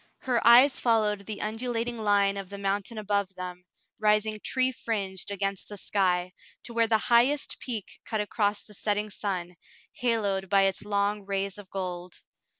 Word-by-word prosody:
Her 245 -3 +1
eyes 250 +4 +7
followed 210 -4 +1
the 215 -2 -5
undulating 230 +2 -2
line 200 -2 +3
of 195 -2 -6
the 200 - -7
mountain 200 +3 -2
above 200 -2 -1
them, 180 0 -7 0.3
rising 215 0 +2
tree 260 0 +2
fringed 200 -6 -3
against 195 -1 -2
the 205 - -7
sky, 180 -2 0 0.3
to 235 - -8
where 230 0 +3
the 220 0 +4
highest 240 +6 +2
peak 225 -6 -6
cut 220 - -2
across 205 0 0
the 210 - -14
setting 210 +1 -1
sun, 185 -3 -3 0.4
haloed 215 -8 0
by 195 0 +5
its 195 -1 +1
long 205 0 0
rays 195 0 -2
of 200 -2 -12
gold. 180 -2 -5
205 Hz, 160 wpm, -28 LUFS, 195-225 Hz, 0.4 s, eyes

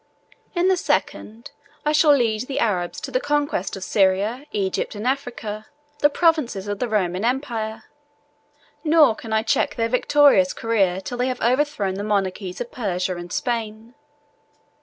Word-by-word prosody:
In 350 +1 +2
the 375 -1 +3
second, 235 -5 -2 0.3
I 300 - +3
shall 300 -1 +5
lead 235 -2 0
the 275 - -4
Arabs 185 -8 -1
to - - -6
the 255 - +1
conquest 290 -10 -1
of 190 - -7
Syria, 205 +9 +1
Egypt, 195 +1 -2
and 210 +2 -6
Africa, 240 -5 -3 0.3
the 290 - +5
provinces 295 - +1
of 205 -1 -3
the 250 - -2
Roman 190 -3 0
empire; 230 -4 -2 1.0
nor 310 -6 +5
can 220 0 -10
I 220 0 +2
check - - +1
their 230 -1 0
victorious 250 -6 +4
career 195 -5 0
till 245 +5 -6
they 250 - +1
have 255 -1 -3
overthrown 250 -5 +1
the - - -4
monarchies 195 -3 -2
of 240 - -5
Persia 190 -8 -2
and 175 0 -8
Spain. 225 -1 -3
225 Hz, 160 wpm, -22 LUFS, 200-270 Hz, 1.0 s, shall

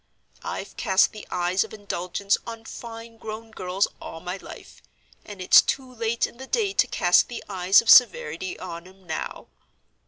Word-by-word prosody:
I've - - -6
cast 190 -3 +3
the 215 - -11
eyes 180 +1 +1
of - - -10
indulgence 200 0 -1
on 230 -1 -8
fine 230 -1 -9
grown 220 +1 -8
girls 185 -1 -1
all 165 - -8
my 180 +3 -5
life, - - -13 0.4
and 205 -2 -10
it's 185 - +7
too 260 -2 -3
late 230 -1 0
in - - -11
the 265 +1 -9
day 410 - 0
to - - +3
cast - - +3
the 240 - -7
eyes 190 +1 +4
of 230 - -4
severity 185 -7 +4
on 170 +1 -8
'em 190 0 -19
now. 160 -2 -5
205 Hz, 175 wpm, -25 LUFS, 185-230 Hz, 0.4 s, it's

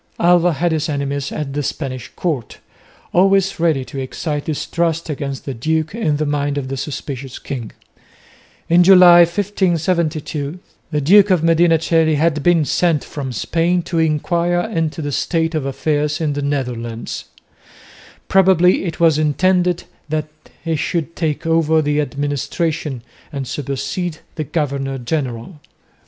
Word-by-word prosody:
Alva 175 0 +4
had 170 +4 0
his 160 0 -1
enemies 140 -1 -2
at 140 -3 -4
the 145 - -1
Spanish 130 -3 -4
court, 150 -11 -3 0.6
always 195 +1 +3
ready 160 -6 +1
to 135 - -7
excite 145 +3 -4
distrust 165 +1 -1
against 140 -2 -5
the 135 - -3
duke 155 +7 -1
in 165 -10 0
the 155 - -1
mind 145 -1 -1
of 135 -2 -3
the 135 - -3
suspicious 135 -1 -6
king. 125 -6 -6 1.0
In 170 +2 +5
July, 180 -1 +8
1572, 170 -4 0 0.3
the 150 -2 -1
Duke 200 +7 +6
of 180 -4 +2
Medina 165 0 +4
Coeli 160 -1 +2
had 155 0 +1
been 165 0 +3
sent 165 0 +1
from 135 -3 -6
Spain 170 - 0
to 170 -1 -2
enquire 170 +3 +1
into 165 -6 -2
the 145 - -3
state 165 +3 0
of 150 -4 -2
affairs 150 +2 -1
in 155 -3 0
the 145 - -3
Netherlands; 120 -5 -3 1.0
probably 190 -1 +4
it 165 -3 -4
was 160 -3 +4
intended 180 +3 +2 0.3
that 155 0 -2 0.4
he 165 -1 0
should 165 +1 -2
take 160 -1 -2
over 165 -1 +3
the 150 -1 +1
administration 145 -1 -2 0.3
and 135 -3 -4
supersede 150 - -3 0.2
the 155 - -4
governor 140 -3 -2
general. 130 +2 -4
155 Hz, 145 wpm, -18 LUFS, 140-170 Hz, 1.0 s, July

